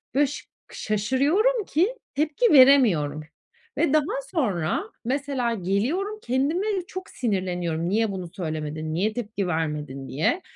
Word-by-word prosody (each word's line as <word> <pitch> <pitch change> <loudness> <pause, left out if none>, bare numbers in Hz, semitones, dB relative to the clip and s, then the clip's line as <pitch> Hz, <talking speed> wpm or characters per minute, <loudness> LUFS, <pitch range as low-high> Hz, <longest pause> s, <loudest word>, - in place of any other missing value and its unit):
böy 290 +2 +5
ş 290 - -7 0.3
şaşırıyorum 290 - +1
ki 375 +11 +1 0.2
tepki 310 - +2
veremiyorum 220 - +5 0.6
ve 320 -4 +2
daha 360 - +1
sonra, 200 - 0 0.2
mesela 265 -2 -1
geliyorum 250 - -1
kendime 285 - 0
de 400 -3 0
çok 375 +1 -7
sinirleniyorum, 180 -7 -2
"Niye 220 +2 +1
bunu 185 -2 -5
söylemedin, 155 -2 -4
niye 200 +6 0
tepki 215 -5 -3
vermedin?" 150 -5 -3
diye. 165 - 0
235 Hz, 125 wpm, -25 LUFS, -, 0.6 s, böy